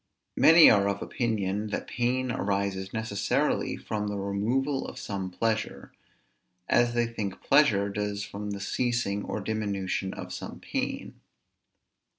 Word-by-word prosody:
Many 165 Hz, +1 st, +8 dB
are 100 Hz, -1 st, +5 dB
of 100 Hz, 0 st, -2 dB
opinion, 105 Hz, -3 st, -1 dB
that 105 Hz, -, -3 dB
pain 125 Hz, +1 st, -1 dB
arises 100 Hz, -2 st, -1 dB
necessarily 110 Hz, -3 st, 0 dB
from 105 Hz, -1 st, -3 dB
the 105 Hz, 0 st, -3 dB
removal 120 Hz, +8 st, -1 dB
of -, -, -9 dB
some 95 Hz, -2 st, -4 dB
pleasure; 110 Hz, +4 st, -2 dB, 0.8 s
as 120 Hz, 0 st, +3 dB
they 120 Hz, 0 st, +3 dB
think 110 Hz, -5 st, -4 dB
pleasure 115 Hz, -9 st, +4 dB
does 105 Hz, 0 st, -3 dB
from 105 Hz, 0 st, -6 dB
the 100 Hz, -1 st, -4 dB
ceasing 115 Hz, -1 st, -1 dB
or -, -, -3 dB
diminution 100 Hz, -3 st, -2 dB
of -, -, -7 dB
some -, -, -7 dB
pain. -, -, -4 dB
105 Hz, 135 wpm, -28 LUFS, 100-120 Hz, 0.8 s, Many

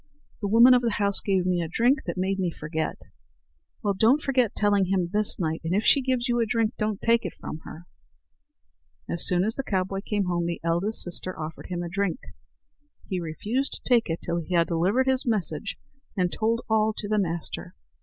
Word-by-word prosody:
"The 205 Hz, -, -1 dB
woman 235 Hz, +5 st, +7 dB
of 250 Hz, -, +4 dB
the 235 Hz, -3 st, 0 dB
house 200 Hz, -1 st, +2 dB
gave 190 Hz, -3 st, 0 dB
me 180 Hz, -1 st, +1 dB
a 165 Hz, -, -3 dB
drink 245 Hz, -, +1 dB
that -, -, -3 dB
made 190 Hz, +1 st, -1 dB
me 185 Hz, -2 st, 0 dB
forget." 160 Hz, 0 st, -4 dB, 0.9 s
"Well, 205 Hz, -1 st, +1 dB
don't 225 Hz, +9 st, +4 dB
forget 255 Hz, -5 st, +1 dB
telling 205 Hz, -2 st, +2 dB
him 180 Hz, -2 st, 0 dB
this 210 Hz, 0 st, +3 dB
night; 160 Hz, -2 st, -2 dB
and 165 Hz, +3 st, -1 dB
if 210 Hz, -, 0 dB
she 280 Hz, -, +6 dB
gives 255 Hz, -1 st, -1 dB
you 240 Hz, -1 st, +1 dB
a 230 Hz, -, +2 dB
drink, 225 Hz, -1 st, 0 dB
don't 215 Hz, -2 st, -1 dB
take 230 Hz, 0 st, +2 dB
it 180 Hz, -, -5 dB
from 155 Hz, -, -6 dB
her." 170 Hz, +2 st, -10 dB, 1.2 s
As 170 Hz, -, +1 dB
soon 180 Hz, 0 st, +2 dB
as 220 Hz, +3 st, -1 dB
the 270 Hz, -, -3 dB
cowboy 190 Hz, -3 st, -1 dB
came 205 Hz, -2 st, -1 dB
home, 175 Hz, -1 st, -1 dB
the 170 Hz, -, -3 dB
eldest 175 Hz, +6 st, 0 dB
sister 180 Hz, 0 st, -3 dB
offered 155 Hz, +1 st, -7 dB
him 175 Hz, -1 st, -4 dB
a -, -, -4 dB
drink. 200 Hz, +5 st, -2 dB, 0.9 s
He 185 Hz, -3 st, -1 dB
refused 205 Hz, -, -2 dB
to -, -, -4 dB
take 235 Hz, -6 st, +3 dB
it 165 Hz, -, -3 dB
till 170 Hz, -, -1 dB
he 175 Hz, +2 st, -3 dB
had 170 Hz, -1 st, +4 dB
delivered 185 Hz, +11 st, +1 dB
his 265 Hz, -1 st, +2 dB
message 200 Hz, -4 st, +1 dB, 0.4 s
and 180 Hz, -2 st, 0 dB
told 230 Hz, +2 st, 0 dB
all 220 Hz, -1 st, +2 dB
to 205 Hz, -, -4 dB
the 215 Hz, 0 st, +1 dB
master. 170 Hz, -4 st, -3 dB
200 Hz, 210 wpm, -26 LUFS, 175-225 Hz, 1.2 s, woman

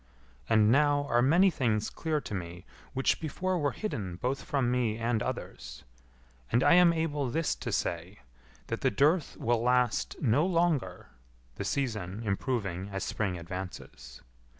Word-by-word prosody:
And 110 Hz, 0 st, +5 dB
now 145 Hz, +1 st, +3 dB
are 120 Hz, -, +3 dB
many 175 Hz, +9 st, +5 dB
things 110 Hz, -8 st, 0 dB
clear 160 Hz, -2 st, -1 dB
to -, -, -7 dB
me 85 Hz, -2 st, -6 dB, 0.3 s
which 135 Hz, -, +1 dB
before 180 Hz, +4 st, -2 dB
were 145 Hz, -2 st, +1 dB
hidden 100 Hz, -, -4 dB
both 125 Hz, +9 st, -2 dB
from 130 Hz, -4 st, 0 dB
me 120 Hz, -3 st, 0 dB
and 115 Hz, -1 st, 0 dB
others. -, -, -6 dB, 0.7 s
And 120 Hz, +3 st, +3 dB
I -, -, +6 dB
am 175 Hz, -1 st, +7 dB
able 150 Hz, -5 st, -1 dB
this 160 Hz, +5 st, 0 dB
to -, -, -5 dB
say, -, -, -3 dB, 0.4 s
that -, -, -4 dB
the -, -, +3 dB
dearth 150 Hz, -, +2 dB
will 115 Hz, 0 st, +1 dB
last 125 Hz, -1 st, +1 dB
no 130 Hz, +3 st, +3 dB
longer 165 Hz, -, 0 dB, 0.5 s
the -, -, -3 dB
season 110 Hz, -7 st, -2 dB
improving 100 Hz, -3 st, -2 dB
as 95 Hz, -1 st, -4 dB
spring 95 Hz, -4 st, -2 dB
advances. 85 Hz, -9 st, -8 dB
120 Hz, 150 wpm, -29 LUFS, 100-150 Hz, 0.7 s, am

